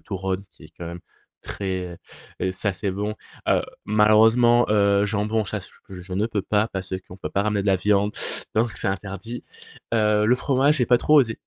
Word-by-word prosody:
turrón, 95 -1 -3
qui 85 - -18
est 80 - -16
quand 85 - -6
même 85 +1 -7 0.4
très, 95 -3 -4
heu - - -14 0.5
heu, - - +1
ça 100 +2 -2
c'est 95 +2 -3
bon, 105 +3 -3 0.3
heu, - - +3 0.2
malheureusement, 110 +3 +5
heu, 100 -1 +3
jambon, 105 +1 0
sache 95 - -5 0.2
que 95 - -12
je 90 +1 -9
ne 100 +4 +1
peux 105 -4 -2
pas, 105 +3 +1
parce 95 -2 -6
qu'on 90 - -11
peut 95 - -6
pas 100 - +1
ramener 105 -2 0
de - - -5
la 95 - +4
viande, 105 +2 +2 0.4
donc 115 0 +2
c'est - - -1
interdi, 100 +4 -5 0.5
heu, 105 -1 +3
le 120 - +5
fromage, 140 +3 +2
j'ai 125 - +2
pas 120 - +4
trop 150 +4 +5
osé, 115 -4 -2
105 Hz, 205 wpm, -23 LUFS, 95-110 Hz, 0.5 s, malheureusement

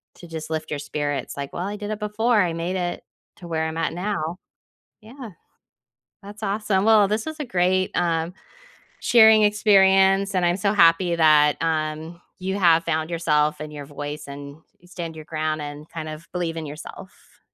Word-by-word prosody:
to 175 - -13
just 160 -1 -7
lift 160 -1 -4
your 145 - -2
spirits 145 -1 -3
like, 140 -1 -6
"Well, 180 +2 -3
I 205 - -4
did 210 0 -6
it 215 - -4
before. 210 +2 +1
I 175 -3 0
made 170 +3 -3
it 175 -1 -3 0.3
to 175 - -11
where 160 -1 -1
I'm 160 0 -5
at 165 - -1
now." 180 -2 -3 0.6
Yeah. 235 +1 -10 0.9
That's 205 +2 -12
awesome. 200 -1 0
Well, 215 -2 +5
this 215 +2 -2
is 315 0 -6
a - - -1
great, 185 -3 +1
um, 170 0 0 0.7
sharing 220 -2 +6
experience, 195 -2 +4
and 185 -1 +1
I'm 175 +1 +2
so 200 +1 0
happy 170 -2 +4
that, 150 -2 +5
um, 160 +1 -2 0.2
you 190 +1 -3
have 170 -3 +4
found 160 0 -1
yourself 150 -3 +1
and 155 0 -7
your 145 -2 -8
voice 145 +1 -7
and 140 +1 -9 0.2
you 175 - -22
stand 170 -3 -7
your 155 - -9
ground 155 -1 -2
and 145 +1 -8
kind 160 -1 -7
of 155 +2 -9
believe 170 -2 -3
in 160 -1 -5
yourself. 150 +6 -12
170 Hz, 185 wpm, -23 LUFS, 155-200 Hz, 0.9 s, sharing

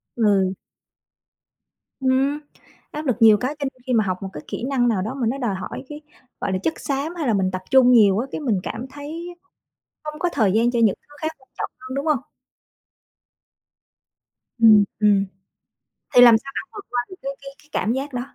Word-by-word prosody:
Ừ. 200 -4 +2 1.5
Ừm, 265 +3 +1 0.5
áp 300 +1 -5
lực 255 - +1
nhiều 220 -2 +7
cái 255 +7 -3
cho - - -4
nên 255 - -26
khi 255 - 0
mà 220 -3 +4
học 185 -1 -1
một 195 - -5
cái 150 - -8
kỹ - - -5
năng 255 -3 +2
nào 215 -5 +1
đó 220 +7 -3
mà 250 -5 -2
nó 260 - -1
đòi 235 -8 -1
hỏi 185 - -6
cái, 295 0 -8 0.4
gọi - - -1
là, - - +1
chất 320 - +1
xám 285 +5 -3
hay 315 -6 -2
là 225 - +2
mình 190 -2 +1
tập 185 0 -4
trung 255 -1 +6
nhiều, 210 -4 +5
á, 255 - -2
cái - - -4
mình 220 -9 0
cảm 235 +3 -5
thấy 300 +5 -7
á, 375 - -40 0.6
không 300 0 -6
có 355 +1 0
thời 205 -5 +2
gian 230 +3 +3
cho 240 - -1
những 215 -4 +4
thứ 290 - -19
khác 315 - 0
quan 260 - -26
trọng - - -3
hơn, 255 0 -7
đúng 275 +3 -3
hông? 300 -3 +3 2.4
Ừm, 220 -3 +7 0.2
ừm. 205 -2 +4 0.9
Thì 245 - +9
làm 235 -2 +9
sao 275 +5 -10
bạn - - -5
vượt 410 -1 -8
qua 245 - 0
được 375 - -10
cái 275 +1 -3
cái 275 0 -10
cái 300 - -25
cảm 220 - 0
giác 275 +1 -4
đó? 245 - -2
250 Hz, 215 wpm, -22 LUFS, 215-280 Hz, 2.4 s, Thì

